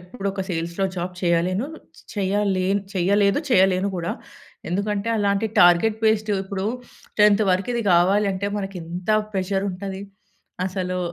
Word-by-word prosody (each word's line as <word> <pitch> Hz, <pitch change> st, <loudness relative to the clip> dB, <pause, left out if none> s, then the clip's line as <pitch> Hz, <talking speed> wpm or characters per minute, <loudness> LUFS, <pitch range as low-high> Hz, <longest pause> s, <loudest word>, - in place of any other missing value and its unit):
ఎప్పుడొక 195 Hz, +1 st, -4 dB
సేల్స్‌లో 170 Hz, +3 st, -2 dB
జాబ్ 180 Hz, +1 st, -3 dB
చేయలెను 180 Hz, +6 st, +1 dB, 0.3 s
చ్ -, -, -14 dB
చెయ్యాలేను 195 Hz, -1 st, +1 dB
చెయ్యలేదు, 200 Hz, +5 st, +2 dB
చెయ్యలేను 190 Hz, -1 st, +3 dB
గూడా. 170 Hz, -1 st, -2 dB, 0.6 s
ఎందుకంటే, 200 Hz, +3 st, -1 dB
అలాంటి 205 Hz, +1 st, +1 dB
టార్గెట్ 175 Hz, +5 st, +5 dB
బేస్డు 215 Hz, -1 st, +2 dB
ఇప్పుడు 190 Hz, 0 st, -3 dB, 0.5 s
10థ్ 210 Hz, 0 st, +5 dB
వరకిది 230 Hz, +6 st, -1 dB
గావాలంటే, 195 Hz, +2 st, +2 dB
మనకింత 180 Hz, -1 st, -5 dB, 0.2 s
ప్రెషరుంటది, 195 Hz, 0 st, -2 dB, 0.6 s
అసలు 185 Hz, -1 st, -3 dB
195 Hz, 110 wpm, -23 LUFS, 180-205 Hz, 0.6 s, టార్గెట్